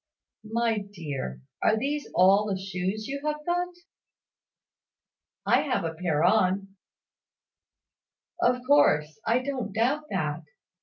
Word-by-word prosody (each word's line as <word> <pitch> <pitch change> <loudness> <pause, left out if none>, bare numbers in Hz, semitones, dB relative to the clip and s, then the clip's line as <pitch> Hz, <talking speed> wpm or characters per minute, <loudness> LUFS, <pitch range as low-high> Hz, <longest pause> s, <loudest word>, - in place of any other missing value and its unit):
My 230 -1 +1
dear, 150 - -6 0.2
are 220 - +3
these 285 +5 -2
all 195 +4 +5
the 195 -2 -2
shoes 190 +2 -3
you 280 +1 -4
have 300 0 -3
got?" 355 +1 0 1.8
"I - - +4
have 255 - -1
a 165 -1 -2
pair 160 -2 0
on." 195 0 +3 1.7
"Of 250 0 +2
course; 160 - +3
I 245 +3 +2
don't 255 -7 -3
doubt 260 +8 +1
that. - - -2
215 Hz, 115 wpm, -27 LUFS, 185-265 Hz, 1.8 s, all